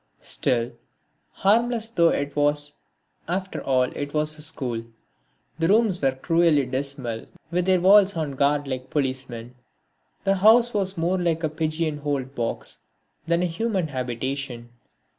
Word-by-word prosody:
Still, 120 -1 0 0.6
harmless 230 +3 +1
though 170 -7 +3
it 145 -2 -2
was, 145 0 +1 0.5
after 185 +2 -3
all 130 -1 +2
it 145 +3 -5
was 155 0 +1
a 150 - -10
school. 130 -7 -2 0.8
The 165 - +2
rooms 205 -2 +3
were 135 -2 +2
cruelly 160 +1 +2
dismal 130 -3 -3 0.2
with 175 +1 0
their 185 -1 +4
walls 195 +1 +6
on 155 -3 -2
guard 140 +1 +1
like 130 -1 -5
policemen. 130 -4 -3 0.7
The 195 0 +2
house 230 +5 +5
was 195 -2 0
more 175 +3 0
like 170 -2 0
a 155 - +1
pigeon 155 0 -2
holed 140 -2 -3
box 115 -3 -4 0.5
than 170 +1 +2
a - - +2
human 185 0 -1
habitation. 130 -1 -4
150 Hz, 140 wpm, -24 LUFS, 135-180 Hz, 0.8 s, walls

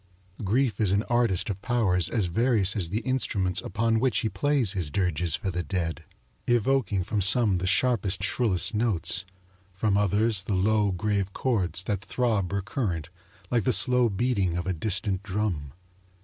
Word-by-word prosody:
Grief 115 +2 0
is 100 -3 +2
an 100 +2 +1
artist 120 -7 +1
of 95 -1 -7
powers 105 -8 +1
as 110 -5 0
various 105 +1 +2
as 90 -6 0
the 105 +6 -2
instruments 100 -9 0
upon 115 +1 0
which 130 +1 +1
he 110 - -1
plays 125 0 +1
his 90 -7 -2
dirges 85 -1 -1
for 95 +2 -3
the 90 0 -2
dead, 85 -3 -3 0.4
evoking 120 -5 +1
from 105 +3 -2
some 100 -1 +3
the 90 - -3
sharpest, 100 -4 +1
shrillest 105 -2 +1
notes, 105 -4 0 0.5
from 100 +1 +1
others 105 +1 +2
the 100 +1 -2
low, 105 +1 +2
grave 100 +1 -2
chords 95 -8 0
that 95 -1 -2
throb 110 -6 -1
recurrent 100 - -3 0.4
like 120 -3 +1
the 130 - +2
slow 120 +4 +4
beating 100 -4 0
of 90 - -3
a 95 - -1
distant 95 +2 -1
drum. 95 -8 -3
100 Hz, 165 wpm, -26 LUFS, 90-115 Hz, 0.5 s, slow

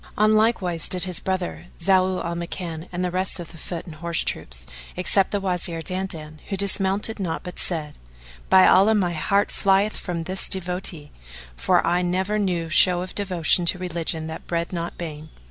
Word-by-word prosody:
On 215 +1 +4
like 220 -1 +2
wise 170 -2 0
did 180 -1 +2
his 180 -3 +3
brother, 185 -2 -3
Zau 185 +1 +2
al 170 - -2
Makan, 170 -1 -5
and 180 0 -2
the 180 - -2
rest 185 +1 0
of 170 - -8
the 165 - -12
foot 170 0 -6
and 165 - -9
horse 170 +1 -1
troops; 60 0 -4 0.3
except 185 +1 +3
the 205 - -1
Wazir 180 -3 -2
Dandan, 160 -4 -4
who 195 - -2
dismounted 200 +2 +1
not 175 -4 -3
but 180 - -7
said, 155 -4 -3 0.5
"By 190 0 +7
Allah, 210 +4 +5
my 180 -4 +1
heart 200 +5 +1
flieth 200 +2 +2
from 170 -2 -4
this 185 +3 +1
devotee, 180 -5 -2 0.4
for - - +2
I 175 +1 +2
never 190 +4 0
knew 180 -5 -1
show 175 +2 +4
of 185 - -8
devotion 180 -3 +2
to 180 - +3
religion 170 -3 -2
that 160 0 -8
bred 170 +1 -2
not 170 -1 -4
bane. 155 -2 -7
180 Hz, 185 wpm, -23 LUFS, 165-190 Hz, 0.5 s, By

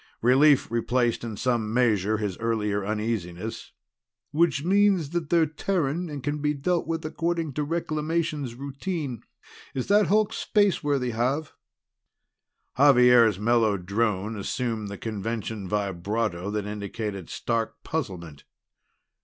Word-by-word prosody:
Relief 135 +2 +5
replaced 120 +1 +1
in 110 -3 -5
some 120 -3 0
measure 110 -4 +2
his 105 -4 -2
earlier 105 -3 0
uneasiness. 105 -2 -3 0.6
"Which 155 -2 +2
means 190 -4 +3
that 170 -3 -2
they're 170 -2 +4
Terran, 165 0 -1
and 145 -3 -6
can 145 +1 -2
be 150 0 +1
dealt 170 +5 0
with 165 -1 -3
according 165 -1 -2
to 150 - -1
Reclamations 155 -4 -2
routine. 140 - -4 0.5
Is 130 - -1
that 205 +1 +5
hulk 215 +1 +2
spaceworthy, 145 - +1
Xav?" 130 +7 -1 1.2
Xavier's 125 -6 +6
mellow 110 -1 +2
drone 100 +2 -1
assumed 110 +1 -3
the 100 0 -6
convention 110 -2 -4
vibrato 100 -1 -2
that 105 -1 -2
indicated 105 -2 -5
stark 115 -1 -2
puzzlement. 90 - -5
120 Hz, 120 wpm, -26 LUFS, 105-150 Hz, 1.2 s, Xavier's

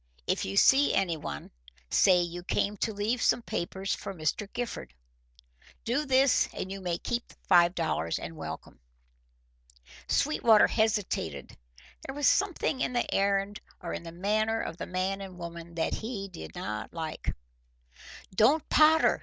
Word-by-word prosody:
If - - 0
you 95 +1 -4
see 275 +2 +5
anyone, 165 - -2 0.4
say 180 -2 +5
you 175 0 -4
came 200 +3 -1
to 220 - -1
leave 215 +4 -1
some 240 - +2
papers 190 +1 -3
for 195 - -6
Mr. 175 +5 -2
Gifford. 150 - -5 0.9
Do 270 +6 0
this 265 0 +4
and 190 - -4
you 195 0 -6
may 175 -2 -1
keep 240 +5 -3
the - - -18
five 175 0 +5
dollars 155 - -1
and 80 - -7
welcome." 80 -6 -8 1.3
Sweetwater 235 -7 +4
hesitated. 200 - -1 0.5
There 270 - -6
was 290 0 +2
something 355 -8 +1
in - - 0
the 240 - -1
errand 200 +1 +1 0.2
or 170 - -5
in - - -4
the 170 -1 -9
manner 215 +5 0
of 165 - -5
the - - -5
man 185 +2 -2
and 190 -2 -8
woman 170 -1 -8
that 165 - 0
he 215 -3 -4
did 80 - -10
not 105 +1 -5
like. 160 -2 -4 1.0
"Don't 265 +10 +3
potter!" 315 +1 +5
195 Hz, 155 wpm, -29 LUFS, 170-225 Hz, 1.3 s, see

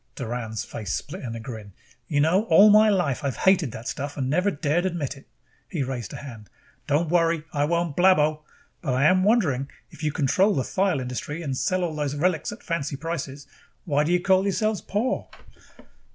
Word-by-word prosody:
Doran's 115 -3 -4
face 105 -8 -6
split - - -6
in 115 -2 -5
a - - -5
grin. 110 -4 -8 0.3
"You 145 +1 +1
know, 180 +8 +3
all 200 +3 +7
my 215 +1 +6
life 175 -11 0
I've 135 -3 -1
hated 185 -9 +3
the 115 -1 -8
stuff 140 +2 -5
and 130 -2 -1
never 180 +6 +2
dared 155 0 0
admit 160 -6 -3
it!" 135 - -16 0.4
He 155 -7 -2
raised 125 -6 -5
a - - -6
hand. 115 -8 -10 0.4
"Don't 150 +3 +1
worry, 165 -2 +2
I 145 -1 +1
won't 170 -1 -1
blabbo. 155 -4 +4 0.4
But 135 -7 -1
I 130 - +2
am 185 +5 +4
wondering, 160 - +2 0.2
if - - -13
you 155 -1 0
control 185 +9 +2
the 135 - 0
thyle 185 -3 0
industry 130 +6 -5
and 135 -4 -2
sell 185 +5 0
all 170 -2 -2
those 145 -2 -2
relics 165 +3 0
at 210 - -10
fancy 150 -4 -2
prices, 140 -3 -5 0.4
why 145 -3 +2
do 155 - -1
you 180 - +3
call 190 +1 +3
yourselves 210 +1 0
poor?" 225 +7 -2
150 Hz, 195 wpm, -25 LUFS, 135-180 Hz, 0.4 s, all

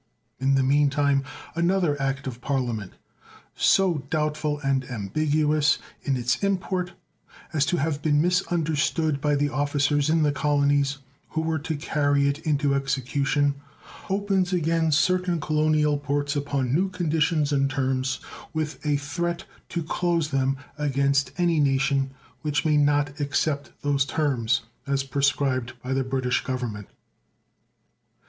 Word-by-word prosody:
In 135 +1 +2
the 135 - +3
mean 145 +2 +3
time 140 -1 +2 0.3
another 170 -2 +1
act 135 0 -1
of 125 -2 -6
Parliament, 120 -8 -2 0.6
so 185 -5 +3
doubtful 150 -1 -1
and 135 -1 +1
ambiguous 150 +7 +1 0.2
in 135 -2 0
its 120 -1 +1
import 185 -2 -1 0.6
as 145 -2 +2
to 175 - +1
have 150 -1 -1
been 145 -1 +2
misunderstood 160 -3 +1
by 150 0 +2
the 145 0 +1
officers 145 +1 +1
in 160 0 +3
the 150 - +3
colonies 145 -1 +1 0.3
who 160 - -1
were 160 0 -1
to 160 +2 -3
carry 145 -1 +1
it 140 +1 -1
into 145 -3 +1
execution, 140 +1 0 0.6
opens 195 -2 +1
again 165 -2 +1
certain 180 +2 +2
colonial 155 -1 +2
ports 145 0 -1
upon 140 -3 -1
new 185 +6 +2
conditions 160 -4 +1
and 140 -1 +2
terms, 130 -1 -1 0.3
with 155 -1 -3
a 150 -1 +1
threat 170 +5 -3 0.3
to 170 - -2
close 170 -1 0
them 135 -1 +1 0.2
against 140 -1 +1
any 170 -3 +2
nation 135 -1 +2 0.3
which 150 +3 -1
may 155 -1 +3
not 145 0 +2
accept 145 -1 -1
those 140 -1 +2
terms 130 -7 0 0.3
as 140 0 +1
prescribed 135 -2 0
by 130 +1 -2
the 135 0 +1
British 130 -1 0
Government. 120 -6 -4
145 Hz, 135 wpm, -25 LUFS, 135-155 Hz, 0.6 s, the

